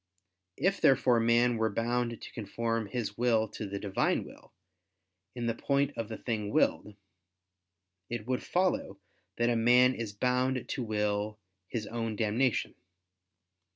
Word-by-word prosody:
If 190 Hz, +7 st, +1 dB
therefore 130 Hz, -3 st, +4 dB
man 115 Hz, +1 st, +3 dB
were 110 Hz, 0 st, +1 dB
bound 115 Hz, +2 st, -1 dB
to -, -, -10 dB
conform 115 Hz, 0 st, -2 dB
his 115 Hz, -2 st, -4 dB
will 115 Hz, -3 st, +3 dB
to 105 Hz, -, -6 dB
the 100 Hz, +1 st, -4 dB
Divine 100 Hz, -1 st, 0 dB
will, -, -, -15 dB, 0.8 s
in 120 Hz, -1 st, -3 dB
the 115 Hz, -, +1 dB
point 140 Hz, +4 st, 0 dB
of 115 Hz, -2 st, -4 dB
the 110 Hz, -, -5 dB
thing 110 Hz, -4 st, -3 dB
willed, 105 Hz, 0 st, +1 dB, 1.1 s
it 120 Hz, -3 st, -4 dB
would 125 Hz, +1 st, -1 dB
follow 175 Hz, -, 0 dB, 0.4 s
that 120 Hz, 0 st, +2 dB
a -, -, +1 dB
man 125 Hz, +3 st, +5 dB
is 115 Hz, -4 st, -4 dB
bound 125 Hz, +4 st, 0 dB
to 130 Hz, -, -2 dB
will 105 Hz, -1 st, -1 dB, 0.3 s
his 110 Hz, +1 st, -3 dB
own 115 Hz, -1 st, -3 dB
damnation. 115 Hz, +4 st, +1 dB
115 Hz, 145 wpm, -30 LUFS, 110-125 Hz, 1.1 s, man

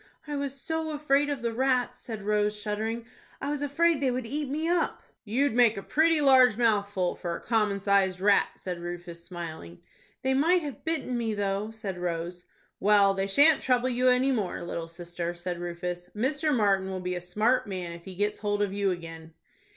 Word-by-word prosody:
"I 295 Hz, -1 st, -4 dB
was 280 Hz, -1 st, -3 dB
so 320 Hz, 0 st, -2 dB
afraid 290 Hz, -1 st, +2 dB
of 280 Hz, -5 st, -3 dB
the 235 Hz, -1 st, -1 dB
rats," 250 Hz, 0 st, +1 dB
said 220 Hz, -4 st, -7 dB
Rose, 210 Hz, 0 st, +1 dB
shuddering. 220 Hz, +2 st, -3 dB, 0.3 s
"I 285 Hz, -, -3 dB
was 295 Hz, -1 st, -3 dB
afraid 310 Hz, +2 st, +2 dB
they 270 Hz, -, +2 dB
would 250 Hz, -1 st, -2 dB
eat 285 Hz, +3 st, -2 dB
me 310 Hz, +4 st, -1 dB
up." 345 Hz, 0 st, 0 dB, 0.2 s
"You'd 250 Hz, +5 st, +1 dB
make 235 Hz, -3 st, +4 dB
a 195 Hz, -, -5 dB
pretty 320 Hz, 0 st, +3 dB
large 260 Hz, -5 st, +6 dB
mouthful 205 Hz, -5 st, +1 dB
for 170 Hz, -1 st, -4 dB
a -, -, -6 dB
common 210 Hz, -3 st, +1 dB
sized 195 Hz, -2 st, +2 dB
rat," 200 Hz, +1 st, +4 dB
said 180 Hz, -2 st, -5 dB
Rufus, 175 Hz, -1 st, -7 dB
smiling. 165 Hz, -, -8 dB, 0.5 s
"They 265 Hz, 0 st, +2 dB
might 330 Hz, +6 st, +3 dB
have 280 Hz, -2 st, -7 dB
bitten 305 Hz, -5 st, -2 dB
me, 225 Hz, -2 st, -1 dB
though," 200 Hz, +1 st, -1 dB
said 210 Hz, -5 st, -6 dB
Rose. 175 Hz, 0 st, -4 dB, 0.3 s
"Well, 200 Hz, -1 st, +5 dB
they 195 Hz, 0 st, -1 dB
shan't 290 Hz, +10 st, +5 dB
trouble 250 Hz, 0 st, +2 dB
you 250 Hz, +1 st, +1 dB
any 255 Hz, +2 st, +3 dB
more, 210 Hz, -8 st, -1 dB
little 170 Hz, -1 st, -4 dB
sister," 175 Hz, 0 st, -5 dB
said 175 Hz, 0 st, -4 dB
Rufus. 175 Hz, 0 st, -5 dB
"Mr. 290 Hz, +7 st, 0 dB
Martin 200 Hz, -6 st, +2 dB
will 190 Hz, -1 st, -3 dB
be 180 Hz, 0 st, -3 dB
a 180 Hz, -, -4 dB
smart 215 Hz, +8 st, +1 dB
man 185 Hz, -3 st, -4 dB
if 170 Hz, 0 st, -10 dB
he 190 Hz, 0 st, -9 dB
gets 205 Hz, +2 st, -1 dB
hold 205 Hz, 0 st, 0 dB
of 200 Hz, -1 st, -2 dB
you 200 Hz, -1 st, +1 dB
again." 165 Hz, -2 st, -7 dB
210 Hz, 195 wpm, -28 LUFS, 180-265 Hz, 0.5 s, large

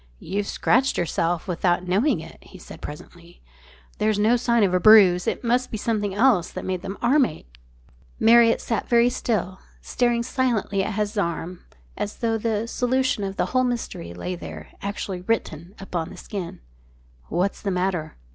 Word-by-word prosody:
"You've 200 Hz, -, -3 dB
scratched 260 Hz, +4 st, +1 dB
yourself 170 Hz, 0 st, -1 dB
without 180 Hz, 0 st, 0 dB
knowing 205 Hz, +12 st, +2 dB
it," -, -, -12 dB
he -, -, -14 dB
said -, -, -12 dB
presently. 170 Hz, +3 st, -11 dB, 0.6 s
"There's 215 Hz, -1 st, +1 dB
no 215 Hz, +4 st, +3 dB
sign 235 Hz, -2 st, +2 dB
of 190 Hz, -2 st, +2 dB
a 180 Hz, -, +3 dB
bruise. 190 Hz, -4 st, +6 dB
It -, -, -2 dB
must 245 Hz, +2 st, +1 dB
be 220 Hz, -, -4 dB
something 205 Hz, -3 st, -1 dB
else 215 Hz, -6 st, +3 dB
that -, -, -7 dB
made 185 Hz, -1 st, -2 dB
the 195 Hz, -, -6 dB
arm 270 Hz, +4 st, +4 dB
ache." -, -, -13 dB, 0.6 s
Marriott 230 Hz, 0 st, +5 dB
sat 230 Hz, -, -3 dB
very 235 Hz, 0 st, +4 dB
still, 195 Hz, -7 st, -2 dB, 0.2 s
staring 240 Hz, -1 st, 0 dB
silently 235 Hz, -6 st, 0 dB
at 205 Hz, +1 st, -3 dB
his 210 Hz, 0 st, -1 dB
arm 170 Hz, -1 st, -3 dB, 0.3 s
as 205 Hz, -, -4 dB
though 225 Hz, -1 st, -1 dB
the 220 Hz, 0 st, -1 dB
solution 255 Hz, -2 st, 0 dB
of 195 Hz, 0 st, -4 dB
the -, -, 0 dB
whole 255 Hz, 0 st, +3 dB
mystery 235 Hz, -, -3 dB
lay 90 Hz, +1 st, -5 dB
there 80 Hz, -3 st, -8 dB
actually 200 Hz, -2 st, -4 dB
written 180 Hz, -3 st, -3 dB
upon 180 Hz, -4 st, -4 dB
the 190 Hz, -, -11 dB
skin. 185 Hz, -, -7 dB, 0.7 s
"What's 180 Hz, +4 st, -1 dB
the 200 Hz, -, -2 dB
matter? 180 Hz, -4 st, -2 dB
200 Hz, 170 wpm, -23 LUFS, 180-230 Hz, 0.7 s, bruise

